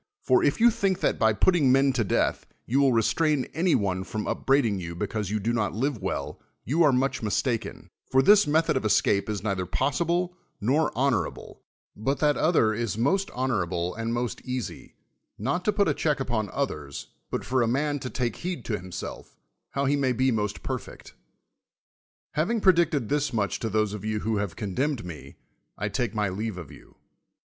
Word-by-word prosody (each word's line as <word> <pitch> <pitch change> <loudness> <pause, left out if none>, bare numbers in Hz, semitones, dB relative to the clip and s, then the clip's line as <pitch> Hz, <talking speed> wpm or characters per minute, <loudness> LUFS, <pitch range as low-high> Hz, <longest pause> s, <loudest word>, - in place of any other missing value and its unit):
For, - - +3
if - - +2
you 235 +1 +6
think 195 -4 0
that - - +1
by 110 0 +4
putting 145 - +3
men 135 +1 +4
to 120 -3 +1
death 100 - 0 0.2
you 130 +4 +1
will 135 -2 +4
restrain 135 +4 +2
any 175 +1 +2
one 95 -3 0
from 105 +2 -4
upbraiding 125 -8 +1
you 85 -1 -6
because 105 +3 -3
you 105 +1 -1
do 115 +4 -1
not 105 -5 -1
live 125 -1 -1
well, 95 - -4 0.2
you 155 +8 +1
are 150 -4 +6
much 130 +2 0
mistaken; 115 +2 -2 0.2
i'or 130 0 +4
this 205 +3 +6
method 160 +2 +2
of - - 0
es 110 - +4
cape 100 +1 0
is 105 -2 -3
neither 95 -4 -1
possible 170 - 0 0.2
nor 135 +10 +2
honorable, 135 -2 -1 0.3
but 135 +7 -1
that 150 +1 +2
other 155 -10 +3
is 110 -2 -2
most 190 - +1
honorable 90 -9 -1
and 115 +1 -3
most 120 0 -2
easy, 125 -3 -6 0.4
not 140 - -1
to 210 - +4
put 200 -1 +2
a - - +2
check 150 -2 0
u]^on 115 -6 -2
others, 75 - -4 0.2
but - - -3
for 130 +1 +1
a 115 - +2
man 145 +4 0
to 130 -1 -5
take 120 -4 -2
heed 180 0 -5
to 110 - -1
himself, 90 -1 -8 0.3
how 140 +1 -1
he 140 +1 +2
may 135 -3 +1
be 130 +2 +2
most 105 -2 -2
perfect. - - -6 1.2
Having 175 +10 0
predicted 170 - +3
thus 145 0 +1
riiiich 105 -4 -1
to 115 - -2
those 110 -1 0
of 105 - -6
you 110 -1 -2
who 110 0 0
have 100 -5 -3
condemned 110 - -2
me, 75 -6 -9 0.4
I - - -2
take 115 -3 -2
my 105 -1 +1
leave 105 +1 -4
of 85 -6 -8
you. - - -16
120 Hz, 190 wpm, -26 LUFS, 105-145 Hz, 1.2 s, you